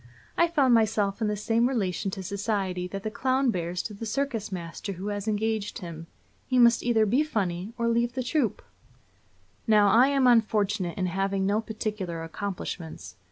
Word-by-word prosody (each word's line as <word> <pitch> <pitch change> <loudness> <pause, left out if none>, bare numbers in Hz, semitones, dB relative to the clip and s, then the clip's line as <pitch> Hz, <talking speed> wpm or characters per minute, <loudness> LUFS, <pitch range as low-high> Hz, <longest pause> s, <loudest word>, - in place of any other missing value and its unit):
I 340 - +4
found 285 -7 +3
myself 215 -2 +2
in 220 - +2
the 210 - 0
same 230 +4 +1
relation 195 -6 -1
to 190 0 -6
society 195 -2 -2
that 195 +2 -6
the 215 - -3
clown 260 +2 +1
bears 175 -2 -3
to 215 - -6
the 220 +3 -6
circus 245 -4 -2
master 180 +2 -5
who 190 +3 -5
has 205 0 -4
engaged 215 0 -1
him 165 -2 -8 0.4
he 255 - +1
must 235 -1 +6
either 230 -3 +3
be 240 +8 +2
funny 195 - -2
or 235 -1 0
leave 235 +1 +1
the 255 - -2
troupe. 255 -3 0 1.0
Now, 210 -2 +5
I 235 +6 +6
am 275 -2 +2
unfortunate 210 -6 +2
in 185 - 0
having 195 +2 -1
no 205 +3 +1
particular 210 -7 -4
accomplishments. 165 - -6
210 Hz, 175 wpm, -27 LUFS, 190-235 Hz, 1.0 s, must